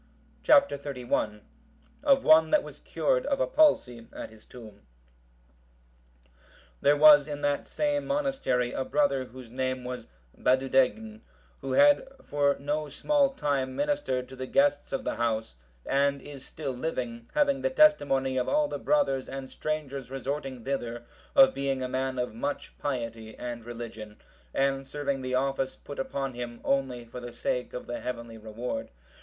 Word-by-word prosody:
Chap. 280 -2 +6
XXXI. 125 -6 -3 0.6
Of 275 -2 +4
one 160 0 +6
that 305 - +3
was - - -11
cured - - 0
of - - 0
a - - +3
palsy 125 - +2
at - - -8
his 110 -1 -18
tomb. 110 -5 -12 2.0
There 145 +1 +4
was 145 -1 +8
in 145 -1 -5
that 145 -1 0
same 290 -1 -1
monastery 270 - 0
a 130 - -1
brother 140 -7 +1
whose 125 -1 -12
name 130 0 -2
was 125 0 -6 0.3
Badudegn, 125 -5 +1 0.4
who 135 - -4
had 290 - +5 0.2
for 145 -1 +1
no 150 +1 -2
small 280 - +2
time 135 - -1
ministered 285 - -1
to 130 - -10
the 130 0 -5
guests 285 - +2
of 265 - -2
the - - -3
house, 110 - -1 0.3
and 140 0 +2
is 140 -1 -10
still 145 -4 -5
living, 125 -4 -4
having 285 -2 +2
the - - +1
testimony 145 - +3
of 125 - 0
all 300 0 +3
the - - -5
brothers 280 - +1
and 135 0 -6
strangers 140 -4 -4
resorting 135 -1 -4
thither, 120 -3 -3 0.3
of 270 -1 +7
being 135 -1 -1
a - - -1
man 130 0 -2
of 125 -2 -2
much 120 +6 -4
piety 115 -5 -4
and 120 -2 -6
religion, 115 -3 -8 0.3
and 135 0 0
serving 140 -2 -2
the 130 0 -2
office 135 0 0
put 145 - -9
upon 135 0 -3
him 120 -1 -6
only 130 -3 0
for 115 +2 -9
the 120 0 -7
sake 125 +1 -2
of 125 - -6
the 120 - -4
heavenly 115 -2 -6
reward. 110 +3 -5
135 Hz, 160 wpm, -28 LUFS, 125-150 Hz, 2.0 s, was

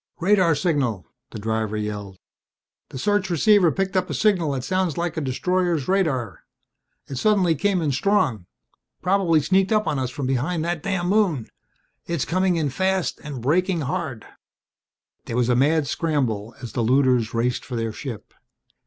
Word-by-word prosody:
"Radar 185 -3 +3
signal!" 135 - 0 0.2
the - - -8
driver 110 0 -2
yelled. 105 -2 -5 0.7
"The - - -8
search 205 +6 0
receiver 180 +1 +4
picked 195 +1 -2
up 185 - +1
a - - -2
signal 180 -9 +2
that 130 -2 -3
sounds 185 +1 -1
like 170 -1 -2
a 160 - -2
destroyer's 170 +3 0
radar. 150 - 0 0.7
It 135 - -7
suddenly 195 -6 +3
came 185 +3 0
in 150 - +1
strong. 130 - +1 0.6
Probably 180 -4 +3
sneaked 190 +5 +2
up 215 -1 +2
on 145 - -1
us 130 -2 -1
from 140 +1 -5
behind 145 +6 -1
that 170 -2 -2
damn 185 -1 -1
moon. 190 - +2 0.6
It's 170 -5 -1
coming 185 +1 +1
in 155 -4 0
fast 190 +4 0
and 140 -6 -7
braking 175 +5 +1
hard!" 140 -5 -4 1.0
There 115 - -3
was 125 -1 +2
a 125 - +3
mad 145 +4 +3
scramble 120 -8 -1
as 120 - -6
the - - -1
looters 125 -2 +2
raced 120 +2 0
for 125 - -6
their 115 -1 -2
ship. 120 -3 -8
155 Hz, 165 wpm, -23 LUFS, 125-185 Hz, 1.0 s, receiver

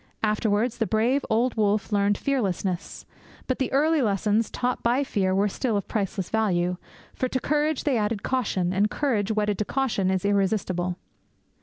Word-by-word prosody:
Afterwards 215 +2 +1
the 225 - +1
brave 240 +6 +1
old 235 +3 +2
wolf 210 -1 +1
learned 200 0 +2
fearlessness; 195 -8 -2 0.4
but 260 - -2
the 265 - -1
early 305 +3 +3
lessons 210 0 +1
taught 250 0 -2
by 245 +4 +2
fear 190 -8 0
were 200 +2 +3
still 220 +2 -1
of 200 - -4
priceless 195 -3 -2
value, 180 -5 +1 0.4
for 255 - -1
to 260 - -1
courage 300 +1 0
they 265 -6 +1
added 210 0 -1
caution; 200 -8 0
and 205 +3 +2
courage 225 -8 0
wedded 210 -2 0
to 210 - 0
caution 235 -8 0
is 190 +1 0
irresistible. 190 -3 0
215 Hz, 165 wpm, -25 LUFS, 200-250 Hz, 0.4 s, early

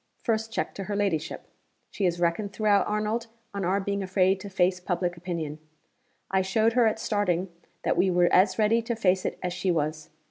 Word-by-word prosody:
First 225 -1 0
check - - -2
to 195 - -6
her 205 +1 -3
ladyship! 190 -7 -1 0.5
She 200 - -1
has 175 -1 0
reckoned 175 +4 0
throughout, 210 -1 +2
Arnold, 215 +2 -1 0.3
on 200 -1 -3
our 185 +3 +1
being 200 0 -2
afraid 190 0 +2
to 200 - -8
face 180 -1 +1
public 175 -1 -2
opinion. 165 -4 -5 0.7
I 190 0 +3
showed 220 +4 +2
her 240 -2 +4
at 220 - 0
starting 195 -4 0 0.3
that - - +1
we 190 - +3
were 175 -1 +3
as 185 0 +4
ready 225 +1 +3
to 230 +1 -3
face 190 -4 +1
it - - -2
as 180 -1 -1
she 185 - -2
was. 155 -2 -1
190 Hz, 200 wpm, -27 LUFS, 180-210 Hz, 0.7 s, her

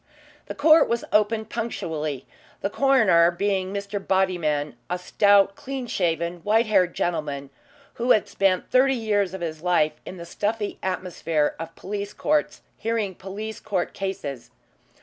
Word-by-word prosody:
The - - -6
court 310 +2 +5
was 235 0 -1
opened 215 +1 +2
punctually, 155 - -3 0.4
the 200 - -2
coroner 220 -12 +4
being 190 +1 -1
Mr. 200 0 -3
Bodyman, 170 -7 0 0.2
a 180 - -1
stout, 200 +1 +3
clean 270 -2 -5
shaven, 170 -4 -1
white 220 +6 +2
haired 190 -5 +2
gentleman 145 -5 -2 0.5
who 245 - 0
had 215 - +4
spent 190 -2 0
thirty 265 +1 +4
years 205 -5 0
of 190 - -7
his 160 -2 -4
life 175 -3 +2
in 185 - -8
the 170 - -8
stuffy 210 +3 -3
atmosphere 175 -5 -1
of 165 - -7
police 200 +1 -5
courts 300 0 0 0.2
hearing 225 -4 -1
police 205 +4 -7
court 190 -5 -2
cases. 150 -10 -5
195 Hz, 145 wpm, -24 LUFS, 170-215 Hz, 0.5 s, court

